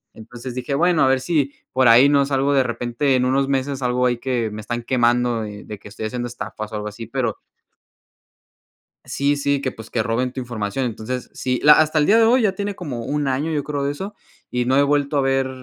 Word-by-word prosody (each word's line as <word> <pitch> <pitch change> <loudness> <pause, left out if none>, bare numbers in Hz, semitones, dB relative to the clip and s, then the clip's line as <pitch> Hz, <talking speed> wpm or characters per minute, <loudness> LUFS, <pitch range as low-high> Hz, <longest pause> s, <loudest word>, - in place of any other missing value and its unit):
Entonces 120 +3 -9
dije: 125 +2 -3
"Bueno, 175 +2 +3
a - - +4
ver 130 0 +3
si 140 -1 0 0.2
por 130 -1 +4
ahí 120 +5 +7
no 140 -1 +3
salgo, 140 0 +1
de 135 -1 +4
repente 120 +3 -1
en 125 0 +2
unos 135 +1 +1
meses, 135 0 -1
salgo 125 -1 0
ahí 120 -1 0
que 120 -3 -1
me 105 +1 -6
están 120 +3 -4
quemando, 120 -1 +1
eh, 105 -1 -8
de - - -12
de 105 - -7
que 105 - -12
estoy 110 +1 -5
haciendo 120 +2 -4
estafas, 110 -2 -7
o - - -3
algo 105 0 -4
así", 115 +3 -9
pero 120 -3 -2 1.7
Sí, 140 +1 0
sí, 140 0 0
que, 130 -2 -2
pues, 110 0 -12
que 115 - 0
roben 120 +3 -1
tu 130 - -9
información. 120 0 -3
Entonces, 120 +1 -4
sí, 125 -1 -2
la 150 - +9
hasta 155 0 +4
el 150 - +3
día 220 +3 +5
de 230 - +5
hoy, 245 +3 +4
ya 205 -3 +2
tiene 200 0 -4
como 130 -9 -5
1 145 +2 -1
año, 135 +4 -1
yo 150 -3 -1
creo 145 -2 -3
de 140 - 0
eso, 195 +8 -7 0.3
y 125 0 -1
no 130 +2 +2
he 140 - +5
vuelto 145 +1 +1
a - - +4
ver 135 0 +1
130 Hz, 240 wpm, -21 LUFS, 120-140 Hz, 1.7 s, la